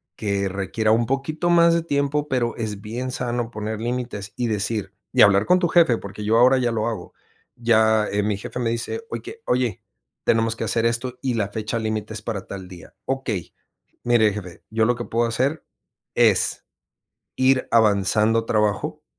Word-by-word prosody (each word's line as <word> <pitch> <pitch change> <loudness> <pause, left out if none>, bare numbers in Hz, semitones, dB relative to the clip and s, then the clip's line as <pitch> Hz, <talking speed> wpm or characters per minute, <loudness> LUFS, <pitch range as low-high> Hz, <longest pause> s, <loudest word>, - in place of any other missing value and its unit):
que 100 -2 -1
requiera 100 +3 -1
un 115 +1 +3
poquito 155 +6 -1
más 170 -1 +6
de 170 - +1
tiempo, 145 -1 0
pero 125 -4 0
es 105 -3 -4
bien 120 +5 -4
sano 120 -2 -2
poner 110 0 -4
límites 120 -4 -4
y 125 - -1
decir, 105 -1 -2 0.2
y - - +4
hablar 100 0 +5
con 180 - +5
tu 175 - +2
jefe, 165 -9 +4
porque 100 +1 -8
yo 110 +2 +3
ahora 130 +2 +6
ya 120 -2 +1
lo 110 0 -1
hago, 105 -7 -5 0.4
ya, 110 -2 +3
eh, 105 - +1
mi 105 -2 0
jefe 115 - -6
me 120 -2 0
dice: 120 - -3
"Oye 450 - -7
oye, 125 -6 0 0.4
tenemos 115 0 +2
que - - -4
hacer 115 0 +1
esto 125 +2 -2
y 130 -2 -1
la 100 -3 -1
fecha 110 +2 -3
límite 110 -1 -3
es 110 - -6
para 100 -3 -4
tal 95 -2 -7
día", 90 -2 -13
"Okey, 130 -9 -3 0.5
mire 115 -3 +4
jefe, 90 -4 -8
yo 110 0 +2
lo 125 - +2
que 120 0 -5
puedo 115 +1 0
hacer 135 +6 -1 0.5
es, - - +3 0.7
ir 130 0 +2
avanzando 110 +1 +3
trabajo 105 -2 0
115 Hz, 180 wpm, -23 LUFS, 105-125 Hz, 0.7 s, más